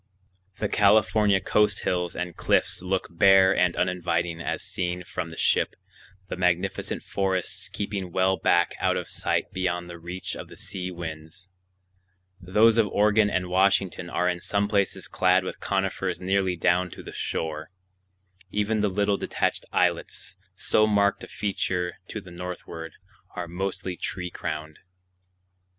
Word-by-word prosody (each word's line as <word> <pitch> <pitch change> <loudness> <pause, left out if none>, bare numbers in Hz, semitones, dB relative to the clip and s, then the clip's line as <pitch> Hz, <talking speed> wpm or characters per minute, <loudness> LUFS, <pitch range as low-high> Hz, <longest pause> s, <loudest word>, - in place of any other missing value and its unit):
The 105 - -1
California 105 0 +4
coast 105 +2 +2
hills 90 -1 -1
and 90 -1 -4
cliffs - - +1
look 95 +1 -1
bare 95 +2 +6
and 90 -1 +2
uninviting 85 -2 -1
as - - -2
seen 90 0 -3
from 85 - -5
the 80 - -10
ship, - - +2 0.5
the - - -4
magnificent 90 -1 0
forests 95 -2 -1
keeping 100 -3 -4
well 95 +2 +2
back 85 -2 +2
out - - +2
of - - -4
sight - - -1
beyond 90 -1 -2
the 85 - -9
reach 90 +2 -5
of - - -7
the - - -13
sea 90 -1 -4
winds; 85 +1 -7 0.9
those 110 +5 +4
of 110 - +4
Oregon 105 +1 +3
and 90 -2 0
Washington 95 -1 +2
are 90 - 0
in 90 -1 -1
some 100 +2 0
places 100 -2 0
clad 95 0 +3
with 95 - -6
conifers 95 -1 -1
nearly 95 0 +1
down 90 +1 +2
to - - -10
the - - -9
shore; 80 -1 -3 0.8
even 105 +2 0
the 105 - +2
little 100 +1 +1
detached - - -1
islets, - - 0 0.2
so 110 - +3
marked 100 -1 +2
a - - -7
feature 90 -3 -2
to 110 - -5
the 95 -3 -13
northward, 85 -2 -7 0.4
are 90 -1 -4
mostly 95 +1 -3
tree 90 0 -3
crowned. 80 0 -5
90 Hz, 150 wpm, -26 LUFS, 90-100 Hz, 0.9 s, bare